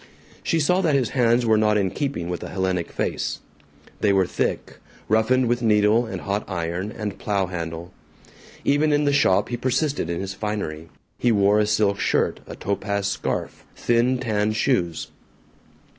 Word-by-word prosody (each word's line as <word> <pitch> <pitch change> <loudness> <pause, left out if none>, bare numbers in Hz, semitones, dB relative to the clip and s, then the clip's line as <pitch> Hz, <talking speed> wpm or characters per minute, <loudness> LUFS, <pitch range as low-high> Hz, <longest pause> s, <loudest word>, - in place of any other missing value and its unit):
She 165 - 0
saw 180 +5 +2
that 160 -6 +2
his 130 -5 +1
hands 120 -1 +2
were 110 -1 +4
not 105 0 +3
in 95 -3 +1
keeping 135 - -3
with 90 0 -4
a - - -6
Hellenic 95 -2 -1
face. - - -2 0.6
They 105 - +3
were 95 -1 +3
thick, - - -3 0.3
roughened 120 +4 +3
with 120 +1 0
needle 110 +1 +3
and - - -5
hot 100 +1 -2
iron 90 +2 -3
and 105 -3 -5
plow 100 -2 0
handle. 85 0 -6 0.7
Even 150 +2 +3
in 145 0 +2
the 145 - +2
shop 100 -8 +3
he 120 - -2
persisted 130 - 0
in 85 - -2
his 95 0 -4
finery. 95 -7 -4 0.3
He 120 - +3
wore 100 0 +4
a 105 - +2
silk 100 -1 +1
shirt, 95 - +1
a - - -7
topaz 100 0 -2
scarf, 100 - -3
thin 120 +2 +2
tan 110 -3 0
shoes. 85 - 0
105 Hz, 170 wpm, -23 LUFS, 95-120 Hz, 0.7 s, were